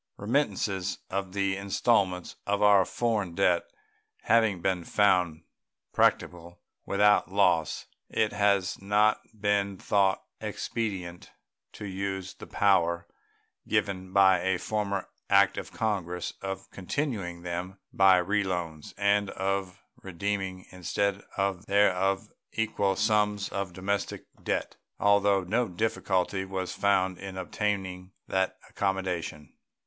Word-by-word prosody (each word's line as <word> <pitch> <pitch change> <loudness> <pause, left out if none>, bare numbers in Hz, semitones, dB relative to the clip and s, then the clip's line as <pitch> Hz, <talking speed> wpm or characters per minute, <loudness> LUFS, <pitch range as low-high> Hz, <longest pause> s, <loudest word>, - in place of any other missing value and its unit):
Remittances 100 -5 0
for 100 +1 +1
the 100 +1 -1
installments 100 -2 +1
of 100 0 +1
our 100 -2 +6
foreign 105 -7 -1
debt 90 -3 +2 0.5
having 110 -5 +3
been 90 0 0
found 90 -5 +2 0.5
practicable 85 0 +1 0.3
without 105 -1 +3
loss, 90 -5 +2 0.2
it 110 -1 +1
has 100 -3 +1
not 105 +2 +3 0.2
been 100 -1 +1
thought 100 -1 +2 0.2
expedient 95 -5 -4 0.4
to 105 - -8
use 95 -1 -4
the - - -11
power 85 -4 +2 0.6
given 100 -3 -1
by 95 -1 +5
a 95 0 +1
former 100 0 -2 0.2
act 100 -1 +5
of - - -8
Congress 90 -6 -2
of 95 0 -5
continuing 95 - -3
them 90 +2 -4 0.2
by 95 -1 +6
reloans, 90 -5 -2
and 100 0 +2
of 95 0 -3 0.2
redeeming 95 0 -3
instead 100 +2 -1 0.5
thereof 95 -1 +2 0.3
equal 105 -3 0
sums 105 -2 +1
of 100 -2 -3
domestic 100 +3 -3 0.2
debt, - - -2 0.2
although 100 -1 +4
no 115 +7 0
difficulty 95 -1 -1
was 95 -1 -4
found 95 -2 +1
in 95 -1 -7
obtaining 95 -1 -3
that 95 0 0
accommodation. 90 -6 -3
95 Hz, 110 wpm, -28 LUFS, 90-100 Hz, 0.6 s, our